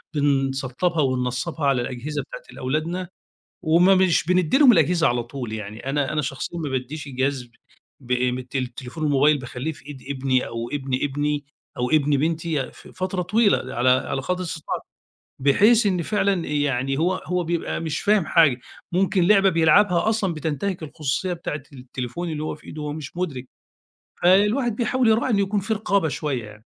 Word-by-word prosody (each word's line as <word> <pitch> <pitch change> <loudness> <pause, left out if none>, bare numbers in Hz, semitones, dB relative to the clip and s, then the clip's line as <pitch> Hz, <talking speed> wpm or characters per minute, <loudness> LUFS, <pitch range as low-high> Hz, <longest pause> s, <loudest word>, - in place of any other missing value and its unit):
بنسطبها 140 +3 0
وننصبها 130 +4 -1
على 135 -3 +3
الأجهزة 130 +4 -4
بتاعة - - -10
الأولادنا، 165 +7 -3 0.5
وما 175 +4 +5
مش 185 -2 +3
بنديلهم 185 - +5
الأجهزة 170 -2 +3
على 120 -1 0
طول، 120 -2 -6
يعني 110 +4 -6
أنا 145 +1 0
أنا 150 - +1
شخصيًا 135 +5 -4
ما 150 - -3
باديش 135 +3 -4
الجهاز 130 -2 -2 0.5
ب 125 -1 -10
م 125 0 +1
التل 130 +1 -4
التليفون 125 +5 -7
الموبايل 145 0 +4
باخلّيه 130 +4 -4
في 145 - -15
إيد 145 -3 -9
ابني 130 -2 0
أو 115 0 -5
ابن 135 -2 -4
ابني 145 +1 -1 0.3
أو 125 0 -1
ابن 150 -2 +3
بنتي 160 -2 -1
ف - - -16
فترة 185 0 -3
طويلة، 200 - +1
على 120 +2 +3
على 130 +1 +1
قدر 180 +6 -2
استطاعتي. 160 -3 -4 0.6
بحيث 205 - +4
إن 180 -3 +1
فعلًا 195 -2 0
يعني 135 -2 0
هو 180 +3 +2
هو 180 -1 0
بيبقى 170 0 -2
مش 160 -2 -3
فاهم 205 -4 +2
حاجة، 145 -7 +4 0.3
ممكن 185 0 +2
لعبة 195 -1 +5
بيلعبها 170 +4 +4
أصلًا 205 -6 0
بتنتهك 160 +5 -3
الخصوصية 155 +3 -2
بتاعة 165 -3 -5
التليفون 130 +5 -5
اللي 150 -1 -4
هو 155 - -3
في 150 - -18
إيده 155 - -7
وهو 150 0 -3
مش 150 0 -8
مدرك. 140 -8 -3 0.8
فالواحد 210 +6 +3
بيحاول 240 0 +1
يراعي 225 +3 +2
إن 210 - +2
يكون 200 +1 +1
في 220 +3 -1
رقابة 200 -5 +1
شوية 140 -5 -3
يعني. 105 +1 -13
150 Hz, 170 wpm, -23 LUFS, 130-180 Hz, 0.8 s, وما